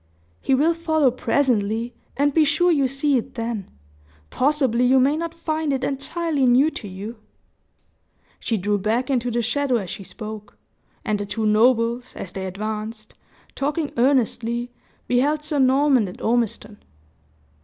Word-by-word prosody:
"He 265 - +2
will 310 +5 +3
follow 315 -5 +2
presently, 235 -3 0 0.2
and 285 0 +2
be 320 - +5
sure 315 +5 +3
you 280 -5 +3
see 275 +1 +1
it 240 - -5
then! 230 -4 -4 0.6
Possibly 265 -4 +2
you 260 +1 +5
may 275 +3 +3
not 335 +1 -3
find 315 -2 -2
it 265 -1 -1
entirely 285 +1 -1
new 265 +6 +4
to 210 - -7
you." 200 +5 -7 1.2
She 225 - -1
drew 205 +2 0
back 230 +7 0
into 245 -2 0
the 235 0 -1
shadow 270 +2 0
as 195 -7 -2
she 195 - -7
spoke; 215 +1 -9 0.5
and 215 -3 0
the 205 - -4
two 215 +2 -2
nobles, 230 +2 +2
as 185 - -6
they 190 -1 -5
advanced, 215 +3 -5 0.4
talking 295 +2 -2
earnestly, 240 -1 +1 0.4
beheld 290 +5 +1
Sir 300 -1 -2
Norman 265 -3 +4
and 180 - -10
Ormiston. 220 -2 -1
250 Hz, 150 wpm, -22 LUFS, 220-285 Hz, 1.2 s, be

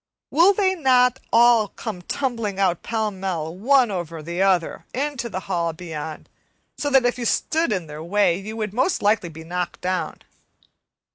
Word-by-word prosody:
Will 340 +6 +6
they 385 -1 +2
not 255 -6 +3
all 235 -2 +5
come 205 -3 -7
tumbling 230 -2 -3
out 180 -3 +1
pell 220 -2 -1
mell, 180 -4 -4
one 245 +3 +3
over 170 -4 -5
the 170 +3 -3
other, 185 -4 +1
into 270 -3 -2
the 185 - -4
hall 170 -4 -1
beyond, 160 -2 -7 0.5
so 290 - -2
that 270 -3 +4
if 245 +1 0
you 240 - -3
stood 320 +4 +1
in 185 -5 -1
their 150 0 -8
way 185 0 +2
you 215 +3 -7
would 215 -3 -3
most 260 - 0
likely 205 -4 +2
be 160 0 -10
knocked 180 +1 -4
down? 185 0 -3
205 Hz, 170 wpm, -23 LUFS, 175-250 Hz, 0.5 s, Will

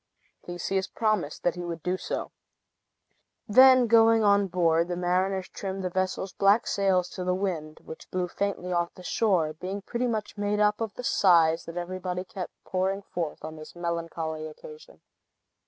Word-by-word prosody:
Theseus 190 +2 -2
promised 215 -9 -1
that 175 - +2
he 175 - -6
would 170 -2 -6
do 180 +1 0
so. - - -4 1.2
Then 255 +3 +7
going 225 -1 +5
on 200 -1 +4
board, 170 -2 +2
the 175 - -2
mariners 185 +2 0
trimmed 195 -1 -5
the 180 - -2
vessel's 185 +1 -2
black 200 +4 +3
sails 190 -2 +1
to 185 - -6
the 180 0 0
wind, 170 -6 -3
which 160 - -10
blew 180 -1 -1
faintly 180 -1 -3
off 170 0 0
the 180 - -12
shore, 180 -6 +1
being 190 +5 -6
pretty 240 +4 -2
much 215 -3 -3
made 205 0 0
up 210 +1 +2
of 225 -2 -2
the 250 - -7
sighs 165 -7 +4
that 165 +1 -8
everybody 180 +1 -3
kept 185 0 -7
pouring 190 +2 -1
forth 165 -5 -5
on 160 0 -7
this 155 +2 -11
melancholy 165 -2 -3
occasion. 460 - -13
185 Hz, 170 wpm, -27 LUFS, 175-200 Hz, 1.2 s, Then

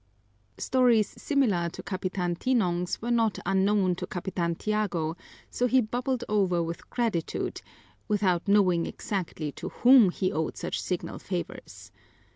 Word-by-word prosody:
Stories 245 -5 +3
similar 215 - +1
to 170 - -9
Capitan 185 -2 -2
Tinong's 180 -6 0
were 240 - -1
not 225 -4 +2
unknown 195 0 +2
to 180 - -5
Capitan 175 -2 -2
Tiago, 180 -6 -1 0.4
so 250 - +1
he 260 +1 +4
bubbled 245 +2 -1
over 190 -5 +2
with 165 +1 -6
gratitude, 225 -9 -2 0.5
without 195 -4 +1
knowing 185 -4 +3
exactly 170 -6 -4
to - - -7
whom 245 -5 +6
he 185 +1 -1
owed 155 0 -2
such - - -3
signal - - -4
favors. - - -6
195 Hz, 130 wpm, -27 LUFS, 175-230 Hz, 0.5 s, whom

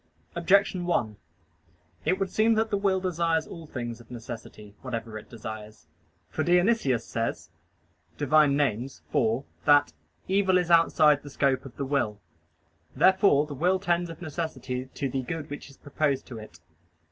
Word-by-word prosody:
Objection 185 +1 +2
1: 115 -11 0 0.9
It 180 +5 +2
would 195 -1 -2
seem 220 +1 +3
that 220 0 0
the 205 - +2
will 195 -1 +1
desires 170 -3 0
all 165 -3 -10
things 120 -4 -5
of 115 - -19
necessity, 115 -3 -9
whatever 115 -3 -5
it 110 - -9
desires. 110 -4 -8 0.4
For - - -2
Dionysius 175 - +2
says 115 0 -3 0.7
(Div. 145 -1 -4
Nom. 150 -2 +5
iv) 125 -1 0 0.2
that 145 - +5 0.3
"evil 190 -1 +3
is 175 -1 0
outside 155 -3 +5
the 145 - -10
scope 135 -2 0
of 135 - -11
the 140 - -2
will." 120 -7 -1 0.8
Therefore 190 -6 +4
the 150 - -7
will 180 +7 +2
tends 175 -2 0
of 165 +2 -9
necessity 130 -6 -4
to 140 - -1
the 130 0 -2
good 150 +3 -6
which 145 - -7
is 140 - -17
proposed 145 -1 -1
to 120 -3 -8
it. 100 -4 -12
145 Hz, 160 wpm, -27 LUFS, 120-175 Hz, 0.9 s, Nom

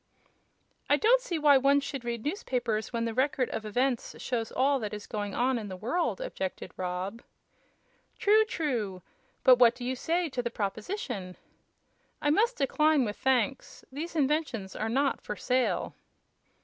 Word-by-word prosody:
"I 290 - +5
don't 480 +8 +4
see 365 -9 -3
why 290 -3 +6
one 280 +2 +4
should 275 -2 -5
read 235 -2 -4
newspapers 245 - -2
when 230 -1 -1
the 230 - -2
Record 260 0 +1
of 220 - -4
Events 245 +3 -1
shows 230 -3 -3
all 275 +2 +2
that 210 -2 -4
is 210 - -8
going 205 -2 -4
on 250 0 +1
in 210 - -6
the 185 -2 -7
world," 330 - -1
objected 345 - -5
Rob. 185 +5 -4 1.0
"True, 430 +2 +5
true! 235 - -2 0.4
But 255 -1 +7
what 235 -2 +6
do 245 - -7
you 260 +1 -1
say 335 +6 0
to 260 -4 -3
the 240 - -2
proposition?" 210 - -4 0.8
"I 295 - +1
must 460 +9 +2
decline, 300 0 +3
with 210 -1 -4
thanks. 265 -1 0
These 320 +5 -6
inventions 280 -9 0
are 220 - -2
not 275 +4 +1
for 210 - -5
sale." 255 +3 0
255 Hz, 160 wpm, -29 LUFS, 220-295 Hz, 1.0 s, But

